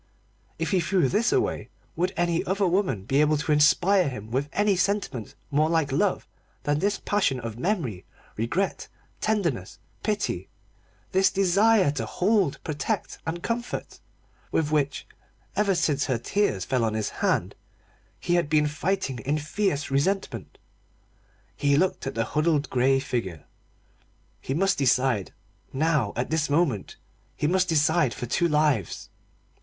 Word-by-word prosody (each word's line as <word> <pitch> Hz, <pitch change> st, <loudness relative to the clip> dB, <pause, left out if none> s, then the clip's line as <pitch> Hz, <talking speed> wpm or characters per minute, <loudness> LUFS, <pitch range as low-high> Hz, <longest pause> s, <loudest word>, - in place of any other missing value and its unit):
If -, -, -2 dB
he 190 Hz, -, +3 dB
threw 175 Hz, -2 st, +2 dB
this 225 Hz, -, +2 dB
away, 390 Hz, -2 st, 0 dB, 0.3 s
would 180 Hz, +2 st, 0 dB
any 170 Hz, -1 st, +1 dB
other 195 Hz, +2 st, +1 dB
woman 175 Hz, -, 0 dB
be 135 Hz, +8 st, +2 dB
able 150 Hz, 0 st, +3 dB
to 150 Hz, +1 st, -2 dB
inspire 170 Hz, +4 st, +4 dB
him 110 Hz, -4 st, -8 dB
with 135 Hz, +4 st, -1 dB
any 205 Hz, -1 st, +2 dB
sentiment 180 Hz, -, -1 dB, 0.2 s
more 155 Hz, +2 st, +2 dB
like 160 Hz, -4 st, +1 dB
love 135 Hz, -, 0 dB, 0.4 s
than 145 Hz, 0 st, +1 dB
this 200 Hz, +3 st, +1 dB
passion 185 Hz, -11 st, +1 dB
of 115 Hz, -1 st, -6 dB
memory, 150 Hz, -, -2 dB, 0.3 s
regret, 140 Hz, -, -1 dB, 0.3 s
tenderness, 170 Hz, -, -1 dB, 0.2 s
pity 210 Hz, -1 st, -2 dB, 0.6 s
this 190 Hz, 0 st, +4 dB
desire 195 Hz, -1 st, +3 dB
to 145 Hz, -, -4 dB
hold, 190 Hz, -7 st, +1 dB
protect, 150 Hz, -2 st, -3 dB
and 170 Hz, +1 st, -3 dB
comfort, 235 Hz, +1 st, -4 dB, 0.5 s
with 155 Hz, -2 st, 0 dB
which, 145 Hz, -2 st, 0 dB, 0.5 s
ever 200 Hz, -1 st, +2 dB
since 150 Hz, -5 st, +1 dB
her 130 Hz, -, 0 dB
tears 115 Hz, -, 0 dB
fell 130 Hz, -3 st, 0 dB
on 110 Hz, -1 st, 0 dB
his 110 Hz, -1 st, -1 dB
hand, -, -, +1 dB, 0.7 s
he 175 Hz, -, -1 dB
had 175 Hz, -4 st, +2 dB
been 155 Hz, -1 st, +3 dB
fighting 150 Hz, -3 st, -2 dB
in 140 Hz, +7 st, -1 dB
fierce 155 Hz, -1 st, -1 dB
resentment. 190 Hz, +9 st, -1 dB, 1.0 s
He 140 Hz, -1 st, +2 dB
looked 185 Hz, +3 st, 0 dB
at -, -, -4 dB
the 115 Hz, 0 st, 0 dB
huddled 150 Hz, -1 st, 0 dB
grey 135 Hz, +1 st, +3 dB
figure. 115 Hz, -, -4 dB, 0.9 s
He 135 Hz, -, -3 dB
must 195 Hz, +1 st, +2 dB
decide 130 Hz, -6 st, +2 dB, 0.4 s
now, 145 Hz, -6 st, +1 dB
at 125 Hz, +5 st, -2 dB
this 160 Hz, -2 st, +1 dB
moment 145 Hz, -, 0 dB, 0.4 s
he -, -, -2 dB
must 185 Hz, +3 st, +2 dB
decide 155 Hz, -5 st, +2 dB
for 120 Hz, -, -4 dB
two 170 Hz, +8 st, +1 dB
lives. 150 Hz, -, 0 dB
150 Hz, 145 wpm, -26 LUFS, 135-185 Hz, 1.0 s, inspire